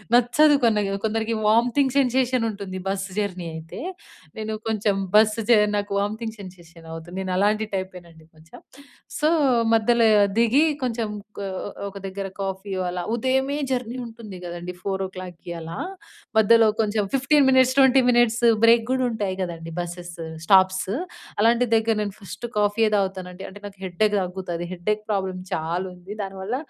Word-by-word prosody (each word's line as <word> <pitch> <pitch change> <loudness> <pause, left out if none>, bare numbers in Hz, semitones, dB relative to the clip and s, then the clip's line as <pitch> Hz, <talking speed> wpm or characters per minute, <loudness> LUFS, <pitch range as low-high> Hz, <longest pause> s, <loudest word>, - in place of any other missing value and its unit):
నచ్చదు 250 +5 +5
కొన్న 225 -2 +3 0.3
కొందరికి 225 +1 -1
వోమిటింగ్ 245 +4 +3
సెన్సేషన్ 255 -2 +2
ఉంటుంది 200 -2 -7
బస్ 195 0 -2
జర్నీ 185 -4 -3
అయితే. 160 0 -8 0.6
నేను 220 0 -3 0.2
కొంచెం 210 -2 +1 0.2
బస్ 215 0 +7 0.2
చె 235 - +8 0.2
నాకు 205 0 -3
వామిటింగ్ 220 +2 -3
సెన్సేషన్ 175 -3 -13
అవుతుంది. 165 +1 -8
నేనలాంటి 200 +4 +1
టైపేనండి 175 -4 -7
కొంచెం. 160 +1 -15 0.6
సో 300 - +2 0.5
మధ్యల 230 +1 +3 0.3
దిగి 235 +5 +4 0.2
కొంచెం 230 -3 -1 0.3
క - - -5 0.5
ఒక 200 - -10
దగ్గర 195 0 -4
కాఫీ, 195 +1 -4
ఇవాల 180 -1 -2
ఉదయమే 265 +4 0 0.2
జర్నీ 250 -1 -2
ఉంటుంది 225 -4 -10
గదండీ 175 +1 -6
4:00కి 185 -3 -5
అలా, 165 +1 -7 0.6
మధ్యలో 225 +1 +6
కొంచెం 210 -1 0
15 275 +2 +4
మినిట్స్ 260 -1 +5
20 265 -1 +6
మినిట్స్ 240 -1 +3 0.2
బ్రేక్ 230 0 +6
గూడా 260 0 +1
ఉంటాయి 205 -5 -2
గదండీ 165 -2 -5
బసెస్ 175 0 -6 0.3
స్టాప్స్. 190 0 +4 0.5
అలాంటి 235 +3 +4
దగ్గర 225 0 +2
నేను 205 -1 -4
ఫస్ట్ 205 +3 -8
కాఫీ‌యే 210 +2 +2
తాగుతానండి. 190 -1 -3
అంటే 205 +2 -13
నాకు 200 -1 -10
హెడ్డేక్ 205 +4 +1
తగ్గుతది. 180 -2 -5
హెడ్డేక్ 210 +4 -2
ప్రాబ్లమ్ 190 -2 -2
చాలా 170 +4 -2
ఉంది. 180 +3 -9
దానివల్ల 195 +4 -4
205 Hz, 140 wpm, -23 LUFS, 185-230 Hz, 0.6 s, చె